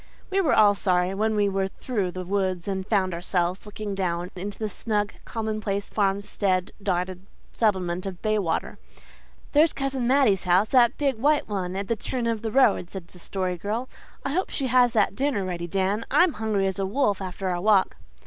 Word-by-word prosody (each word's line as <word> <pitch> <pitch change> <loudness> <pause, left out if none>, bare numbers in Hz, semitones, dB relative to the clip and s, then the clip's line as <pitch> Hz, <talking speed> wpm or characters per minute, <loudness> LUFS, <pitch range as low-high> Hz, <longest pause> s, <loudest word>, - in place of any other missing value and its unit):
We 390 +1 +3
were 320 - +3
all 205 -1 +6
sorry 185 -2 +1
when 215 +2 0
we 205 -1 +3
were 195 -1 0
through 200 -1 -3
the 185 +1 -6
woods 185 -2 -1
and 190 -1 -3
found 190 -4 +1
ourselves 175 +2 -1
looking 210 0 -5
down 180 -2 -2
into 195 +2 -5
the 220 - -2
snug, 210 0 -2
commonplace, 215 -3 -3
farmstead 200 -2 0
dotted 185 -1 -2 0.3
settlement 185 -4 0
of 185 -2 -6
Baywater. 210 -6 -1 0.7
"There's 305 +2 +4
Cousin 270 -3 -2
Mattie's 250 -8 +3
house 180 +4 +3
that 245 -1 +4
big 275 -5 0
white 295 +4 +2
one 190 -3 -3
at 195 0 -3
the 230 - +1
turn 240 +3 -3
of 230 -2 -1
the 225 - -3
road," 215 -8 +3
said 180 -3 -8
the 180 - -16
Story 185 0 -3
Girl. 220 +7 -3 0.4
"I 275 - -1
hope 370 +6 0
she 275 - -2
has 245 -1 +4
that 210 -4 +2
dinner 260 -7 0
ready, 175 -2 -4
Dan. 195 +4 0
I'm 355 -3 +4
hungry 215 -3 0
as 190 +1 -1
a 195 - 0
wolf 205 -3 +1
after 185 0 -4
our 175 -1 -1
walk." 200 -1 +3
200 Hz, 190 wpm, -25 LUFS, 185-225 Hz, 0.7 s, all